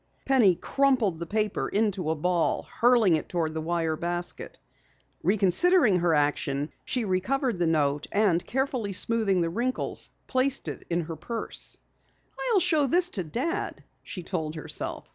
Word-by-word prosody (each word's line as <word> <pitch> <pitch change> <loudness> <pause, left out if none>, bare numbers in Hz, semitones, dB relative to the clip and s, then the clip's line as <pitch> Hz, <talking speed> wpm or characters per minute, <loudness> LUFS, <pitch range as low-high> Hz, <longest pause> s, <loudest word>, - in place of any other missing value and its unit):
Penny 240 -9 +4
crumpled 250 -8 +1
the 170 - -5
paper 215 0 -1
into 200 -6 0
a 160 - +1
ball, 175 +2 0
hurling 230 -8 +3
it 155 - -7
toward 165 -3 -2
the 160 - -3
wire 165 -1 -1
basket. 175 +2 -4 0.6
Reconsidering 205 - +4
her 170 -2 +2
action, 145 0 0
she 250 -3 -2
recovered 210 +4 -1
the 175 - +1
note 150 -2 0
and, 200 -5 +2
carefully 255 -6 -2
smoothing 200 -2 +3
the 165 -1 -1
wrinkles, 245 +7 0 0.2
placed 260 +1 0
it - - -7
in 175 0 0
her 165 0 -6
purse. 230 +9 -6 0.7
"I'll 440 -4 +4
show 310 -5 +3
this 355 +6 +3
to 190 - -2
Dad," 265 - -3 0.2
she 180 - -7
told 160 -3 -4
herself. 155 - -4
190 Hz, 150 wpm, -26 LUFS, 165-245 Hz, 0.7 s, Penny